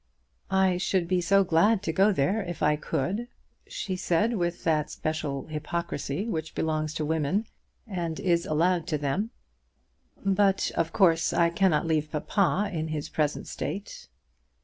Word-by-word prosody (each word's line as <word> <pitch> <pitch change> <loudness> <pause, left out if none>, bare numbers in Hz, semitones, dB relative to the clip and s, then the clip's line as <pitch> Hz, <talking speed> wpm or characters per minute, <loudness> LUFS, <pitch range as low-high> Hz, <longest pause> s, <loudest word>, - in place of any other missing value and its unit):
"I 190 -1 +3
should 180 -1 0
be 180 0 +1
so 195 +3 +4
glad 190 +5 +3
to 160 - -1
go 195 +5 +4
there 190 +5 +1
if 175 -5 -5
I 150 0 +4
could," 185 - -2 0.4
she 190 -3 -4
said, 185 +6 +1
with 175 -3 -2
that 155 -3 +1
special 155 -3 -3
hypocrisy 155 - -3
which 160 -7 -4
belongs 155 -1 -1
to 155 - -1
women, 160 +7 0 0.4
and 175 -7 -3
is 170 -2 +1
allowed 170 +2 +1
to 155 - 0
them; 150 +10 -1 1.0
"but, 195 0 +2
of 165 0 0
course, 165 -5 +3
I 170 -1 +3
cannot 170 -4 +2
leave 155 -2 0
papa 195 +5 +1
in 160 -1 -2
his 155 -2 -4
present 150 -2 -1
state." 485 - -6
170 Hz, 150 wpm, -27 LUFS, 155-190 Hz, 1.0 s, so